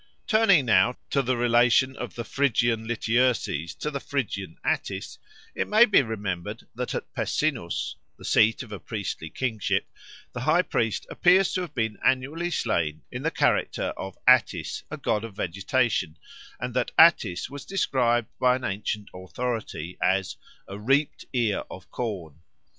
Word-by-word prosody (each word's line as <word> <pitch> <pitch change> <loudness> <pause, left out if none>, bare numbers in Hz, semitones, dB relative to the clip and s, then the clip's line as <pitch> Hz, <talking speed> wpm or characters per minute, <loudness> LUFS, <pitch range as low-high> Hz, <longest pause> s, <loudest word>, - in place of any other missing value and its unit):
Turning 215 - +4
now 110 +1 +4
to 140 - +3
the 130 -1 0
relation 120 +2 +3
of 125 - -6
the 115 - -4
Phrygian 120 -4 +1
Lityerses 115 - 0
to 150 - -3
the 140 - -3
Phrygian 100 - -4
Attis, - - -2 0.3
it - - -2
may 215 +3 +6
be 210 - +5
remembered 105 -3 -4
that 125 +1 -4
at - - -6
Pessinus 130 - -1 0.2
the - - -12
seat 110 +3 +3
of 115 - -13
a 105 - -6
priestly 95 -4 -5
kingship 115 -2 -1 0.5
the - - -5
high - - +3
priest 110 -2 -1
appears 180 +1 +4
to 185 - 0
have 170 -4 -7
been 110 -3 -1
annually 140 +7 +1
slain 80 - -1
in - - -5
the - - +1
character - - 0
of 95 -1 -7
Attis, 115 - +3
a - - -5
god 105 - -1
of 115 -4 -8
vegetation, 100 - 0 0.4
and 125 0 -4
that 125 - 0
Attis 110 - +5
was 140 -1 -7
described 120 - +1
by 125 0 +4
an 130 - -6
ancient 105 +1 -3
authority 95 -2 -5
as 95 0 +1 0.3
"a 100 +1 -7
reaped 135 +7 +1
ear 115 -6 +1
of 95 - -11
corn." 90 - -5
120 Hz, 155 wpm, -26 LUFS, 100-130 Hz, 0.5 s, may